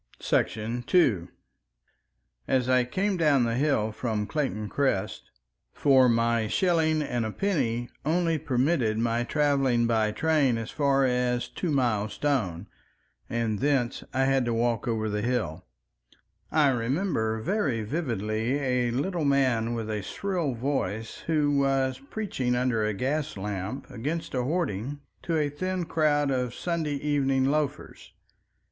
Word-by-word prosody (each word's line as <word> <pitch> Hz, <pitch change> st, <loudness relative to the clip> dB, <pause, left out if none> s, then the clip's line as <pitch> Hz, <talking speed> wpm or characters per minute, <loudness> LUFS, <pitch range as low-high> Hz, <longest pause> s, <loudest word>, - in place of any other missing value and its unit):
§ 115 Hz, +3 st, -1 dB
2 105 Hz, -, +3 dB, 1.2 s
As 130 Hz, -2 st, +1 dB
I 130 Hz, -1 st, +3 dB
came 190 Hz, +9 st, -1 dB
down 150 Hz, -6 st, +3 dB
the 115 Hz, -1 st, 0 dB
hill 125 Hz, -5 st, +1 dB
from 110 Hz, -2 st, -2 dB
Clayton 110 Hz, -6 st, -2 dB
Crest—for 125 Hz, -, 0 dB
my 115 Hz, -1 st, +2 dB
shilling 160 Hz, -, +2 dB
and 120 Hz, -4 st, -2 dB
a 110 Hz, -, -2 dB
penny 120 Hz, -, -1 dB, 0.2 s
only 165 Hz, +1 st, +1 dB
permitted 130 Hz, -5 st, +1 dB
my 115 Hz, +1 st, +1 dB
traveling 135 Hz, -4 st, +2 dB
by 110 Hz, -2 st, +2 dB
train 140 Hz, 0 st, +2 dB
as 115 Hz, -1 st, -5 dB
far 140 Hz, -2 st, +2 dB
as 125 Hz, -1 st, 0 dB
Two 180 Hz, -, -4 dB
Mile 120 Hz, -7 st, +1 dB
Stone, 105 Hz, -, -1 dB, 0.6 s
and 115 Hz, -3 st, -1 dB
thence 135 Hz, -4 st, 0 dB
I 135 Hz, -, +1 dB
had 135 Hz, -1 st, +2 dB
to 120 Hz, -1 st, 0 dB
walk 115 Hz, -1 st, 0 dB
over 110 Hz, -2 st, 0 dB
the 105 Hz, 0 st, -2 dB
hill—I 80 Hz, -, -3 dB
remember 120 Hz, -, 0 dB
very 135 Hz, -, 0 dB
vividly 115 Hz, -, -1 dB
a 125 Hz, -3 st, 0 dB
little 160 Hz, +8 st, -1 dB
man 130 Hz, -5 st, +2 dB
with 115 Hz, -2 st, -3 dB
a 105 Hz, -1 st, -2 dB
shrill 170 Hz, -, -2 dB
voice 115 Hz, -4 st, -2 dB
who 145 Hz, -3 st, +2 dB
was 135 Hz, -1 st, +1 dB
preaching 135 Hz, -, -2 dB
under 125 Hz, -3 st, +1 dB
a 105 Hz, -1 st, -1 dB
gas 140 Hz, +4 st, -2 dB
lamp 100 Hz, +6 st, -4 dB
against 150 Hz, +8 st, -4 dB
a 130 Hz, -, 0 dB
hoarding 145 Hz, -, -2 dB, 0.2 s
to 165 Hz, -2 st, -1 dB
a 150 Hz, -2 st, 0 dB
thin 185 Hz, +4 st, -2 dB
crowd 145 Hz, -3 st, +2 dB
of 125 Hz, -2 st, -1 dB
Sunday 165 Hz, -4 st, -2 dB
evening 135 Hz, -2 st, +1 dB
loafers. 145 Hz, 0 st, -2 dB
130 Hz, 135 wpm, -27 LUFS, 115-145 Hz, 1.2 s, 2